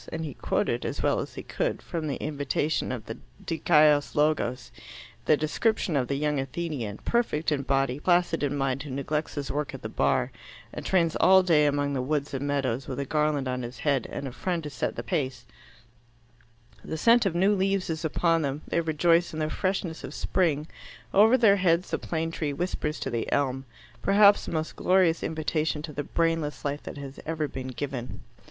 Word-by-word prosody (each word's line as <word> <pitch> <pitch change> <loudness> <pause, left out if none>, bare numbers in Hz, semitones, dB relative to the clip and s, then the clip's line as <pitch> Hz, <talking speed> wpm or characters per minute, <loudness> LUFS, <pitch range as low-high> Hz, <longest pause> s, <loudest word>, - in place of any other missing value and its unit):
And 160 0 -3
he 145 - -5
quoted, - - -1
as - - -3
well - - +2
as - - -6
he - - -6
could, - - -2
from 160 -2 -4
the 140 - -1
invitation 145 0 -1
of 120 -4 -5
the 115 - -7 0.3
Dikaios 150 -3 +3
Logos, 150 -4 0 0.5
the 155 - +4
description 170 +4 0
of 130 -3 +1
the 140 - -1
young 150 0 0
Athenian, 135 -6 -4
perfect 195 -11 +1
in 145 -2 +1
body, 135 -1 0
placid 175 0 +2
in 145 0 0
mind, 135 -1 0
who 150 - -7
neglects 145 +3 -2
his 145 -2 -3
work 145 0 -3
at - - -10
the - - -4
Bar - - +1 0.4
and - - -6
trains 170 -4 +2
all 190 0 +6
day 155 -5 +4
among 145 0 0
the 130 - -1
woods 140 +1 -2
and 135 +1 -2
meadows, 135 -3 -1
with 130 - -4
a 140 - -2
garland 150 -2 0
on 125 0 -2
his 120 0 -7
head 140 -4 +2
and 140 - -4
a - - -5
friend 170 +5 -2
to 150 - -6
set 125 - -2
the - - -5
pace; 130 -8 -2 1.4
the 160 - -4
scent 230 +5 +5
of 175 - -2
new 195 +4 +4
leaves 195 -1 0
is 160 0 -3
upon 165 +1 +2
them; 145 +1 -3
they 170 - +1
rejoice 165 +2 +2
in 160 - -4
the 155 0 -1
freshness 185 -3 -2
of 150 - -7
spring; 155 -6 0 0.5
over 220 +6 +6
their 210 -5 +5
heads 180 -1 +2
the - - 0
plane 165 0 -2
tree 150 -3 -2
whispers 155 -1 -2
to 135 - -3
the 115 -1 -2
elm, 135 -1 0 0.4
perhaps 205 +1 +5
the - - -4
most 160 -1 -2
glorious 180 -3 +3
invitation 155 -1 -1
to 155 -1 -7
the 145 - -2
brainless 165 -3 -1
life 145 +1 -2
that - - -8
has 140 -1 -8
ever 160 -2 -1
been 130 -2 -6
given. 130 -1 -5
150 Hz, 200 wpm, -27 LUFS, 140-165 Hz, 1.4 s, all